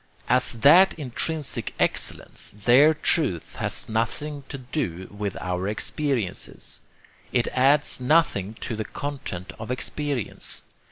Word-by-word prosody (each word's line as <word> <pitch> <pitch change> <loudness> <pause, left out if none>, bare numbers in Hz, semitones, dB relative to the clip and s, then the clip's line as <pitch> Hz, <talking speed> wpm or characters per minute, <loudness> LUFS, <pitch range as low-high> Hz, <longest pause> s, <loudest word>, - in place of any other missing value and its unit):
As - - +4
that 180 +9 +7
intrinsic 150 +1 -1
excellence, - - -2
their 130 +9 +5
truth 150 - 0
has - - -1
nothing 140 +6 -2
to 135 - -5
do 110 - -4
with 100 -2 -4
our 90 +1 -3
experiences. 115 0 -3 0.5
It 120 -2 +1
adds 135 +3 +3
nothing 125 - +2
to 115 - -3
the 110 - -3
content 100 -10 -6
of 110 - -7
experience. 135 - -2
125 Hz, 115 wpm, -25 LUFS, 105-150 Hz, 0.5 s, that